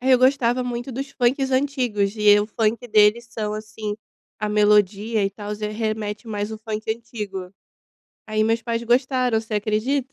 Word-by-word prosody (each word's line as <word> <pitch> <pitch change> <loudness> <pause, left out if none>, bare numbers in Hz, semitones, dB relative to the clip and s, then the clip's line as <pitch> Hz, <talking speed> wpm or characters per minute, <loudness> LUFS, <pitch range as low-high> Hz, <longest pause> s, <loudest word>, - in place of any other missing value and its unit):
Eu 255 0 +5
gostava 255 -1 +3
muito 245 +1 -4
dos 270 +3 -5
funk 260 +1 +1
antigos 250 -7 0
e 210 -1 +6
o 205 - 0
funk 225 +2 -1
deles 215 +2 +4
são, 215 -2 -3
assim, 215 -1 -5 0.4
a 210 - -2
melodia 210 +1 +3
e 195 - 0
tal, 205 +1 -6
já 210 0 -4
remete 215 0 -3
mais 205 -1 -3
o 220 - -6
funk 215 0 -4
antigo. 210 -5 -5 0.7
Aí 215 0 0
meus 225 +1 +1
pais 230 0 -2
gostaram, 250 -1 +2
você 220 -1 -6
acredita? 230 +6 0
220 Hz, 165 wpm, -23 LUFS, 210-245 Hz, 0.7 s, e